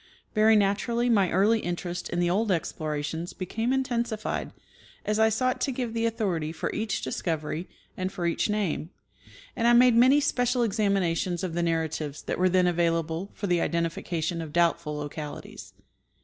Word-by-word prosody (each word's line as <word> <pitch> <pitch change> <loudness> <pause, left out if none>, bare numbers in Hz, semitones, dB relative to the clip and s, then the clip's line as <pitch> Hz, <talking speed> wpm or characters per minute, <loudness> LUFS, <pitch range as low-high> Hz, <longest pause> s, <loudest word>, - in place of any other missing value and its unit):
Very 220 0 +5
naturally 230 +4 +1
my 200 -5 +3
early 210 +5 +3
interest 175 -1 -4
in 175 - -2
the 175 - +2
old 200 +4 +1
explorations 160 -1 -3
became 225 +6 -2
intensified 240 -4 -1 0.5
as 210 +1 0
I 220 0 +5
sought 255 +4 0
to 275 - +1
give 245 -3 -3
the 230 0 +1
authority 185 -9 -1
for 160 - -4
each 215 -1 -2
discovery 160 0 -3 0.3
and 185 +1 -3
for 180 -3 -4
each 170 +5 0
name; 200 -6 -1 0.7
and 235 - +1
I 240 - +6
made 245 0 +6
many 260 +5 +6
special 245 -3 +1
examinations 195 -5 0
of 180 -3 -3
the 175 - 0
narratives 160 -3 -2
that - - -3
were 185 0 +4
then 180 0 +3
available 170 +1 0
for - - -4
the 175 -3 +2
identification 170 0 -1
of 160 -2 -7
doubtful 170 -3 +1
localities. 150 0 -7
185 Hz, 165 wpm, -27 LUFS, 165-225 Hz, 0.7 s, I